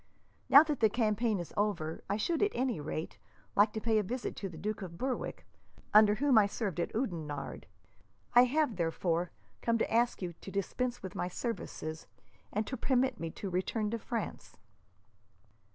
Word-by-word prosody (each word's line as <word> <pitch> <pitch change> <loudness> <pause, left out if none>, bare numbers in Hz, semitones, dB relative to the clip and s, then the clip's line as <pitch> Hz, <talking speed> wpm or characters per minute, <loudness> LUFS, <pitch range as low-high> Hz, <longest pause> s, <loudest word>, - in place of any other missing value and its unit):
Now 280 - +10
that 300 -4 -2
the 220 - +5
campaign 220 0 +1
is 175 -2 -6
over, 175 -7 -1
I 200 - +1
should, 325 +10 0
at 410 0 +2
any 250 -6 0
rate, 155 +2 -5 0.4
like 205 +1 +5
to 220 - -2
pay 220 0 +2
a - - +3
visit 240 +6 -4
to 195 - -4
the 165 - -10
Duke 210 +6 -3
of 170 -3 -7
Berwick, 260 +3 -3 0.5
under 210 0 +7
whom 270 -2 +5
I 205 - +4
served 200 -5 -3
at 170 - -1
Oudenarde. 165 - -3 0.7
I 245 +1 +8
have, 280 - +1
therefore, 170 0 0 0.3
come 230 0 +2
to 225 - -1
ask 235 -3 +2
you 175 -1 -3
to 170 - -11
dispense 240 +6 -2
with 190 - -6
my 180 - -2
services, 175 -6 -5 0.4
and 215 +1 -1
to 260 - -4
permit 260 +1 +1
me 165 - -3
to 190 +4 -6
return 210 +4 -1
to 230 - -2
France." 225 0 -5
215 Hz, 180 wpm, -32 LUFS, 180-240 Hz, 0.7 s, Now